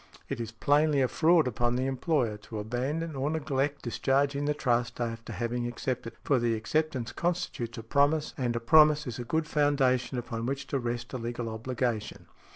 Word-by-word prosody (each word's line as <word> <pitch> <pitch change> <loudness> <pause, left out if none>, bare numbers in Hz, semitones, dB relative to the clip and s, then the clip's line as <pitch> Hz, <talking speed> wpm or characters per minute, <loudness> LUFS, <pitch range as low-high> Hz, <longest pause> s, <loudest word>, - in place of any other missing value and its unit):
It - - -3
is 115 -1 -5
plainly 145 +4 +3
a - - +3
fraud 165 +1 +4
upon 120 0 0
the 130 +1 0
employer 135 -4 0
to 110 +1 -9
abandon 135 +9 -2
or 135 +2 -1
neglect 145 -2 -1
discharging 140 +3 +1
the 150 0 +1
trust 120 -4 0
after 115 -1 -4
having 120 +1 -2
accepted 120 0 -3
it, - - -28
for 135 -3 +2
the 120 -1 +1
acceptance 125 +3 -1
constitutes 170 -9 -2
a 115 - -6
promise, 145 +5 +2
and 120 -3 -1
a - - 0
promise 150 +4 +5
is 125 -2 -5
a - - -3
good 160 +6 0
foundation 135 -4 +2
upon 115 -1 -4
which 135 +1 -2
to 140 - 0
rest 120 0 -4
a 130 - -3
legal 120 0 -4
obligation. 115 -1 -3
130 Hz, 185 wpm, -29 LUFS, 120-145 Hz, -, promise